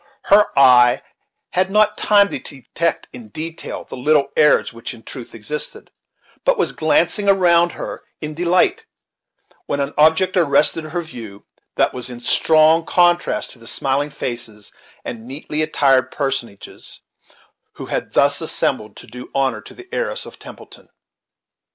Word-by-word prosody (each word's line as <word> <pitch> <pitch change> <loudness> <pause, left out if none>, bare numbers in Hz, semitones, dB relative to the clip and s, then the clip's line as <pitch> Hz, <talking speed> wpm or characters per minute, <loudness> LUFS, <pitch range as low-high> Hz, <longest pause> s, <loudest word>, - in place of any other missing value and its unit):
Her 210 +1 +6
eye 125 -3 +6 0.5
had 185 +1 +1
not 210 +1 +3
time 205 -1 +4
to - - -5
detect, 150 +4 -4
in 120 -4 -11
detail, 160 +7 -6
the - - -10
little 140 +2 +2
errors 150 -5 +3
which 115 0 -7
in 115 - -17
truth 125 -4 -9
existed, 150 - -5 0.5
but - - +2
was 430 - +1
glancing 165 +6 +1
around 175 -3 +4
her - - -7 0.2
in 155 -1 -6
delight, 185 - +1 0.8
when 140 - -2
an 140 +1 -2
object 160 +5 +4
arrested 155 -1 +2
her 170 +3 -4
view 115 -10 -11 0.3
that - - +1
was 125 0 -5
in 120 -1 -8
strong 155 +5 +3
contrast 175 +1 +1
to 125 - -16
the 115 - -14
smiling 140 +4 -1
faces 120 -6 -6 0.3
and 115 -1 -7
neatly 150 +3 -4
attired 135 -4 +2
person 135 -4 -2
ages 100 - -12 0.7
who - - -9
had - - -4
thus - - +3
assembled 105 -1 -2
to - - -12
do 125 +3 -11
honor 130 -5 0
to - - -14
the 370 0 -13
heiress - - -2
of - - -13
Templeton. - - -13
150 Hz, 150 wpm, -19 LUFS, 125-175 Hz, 0.8 s, Her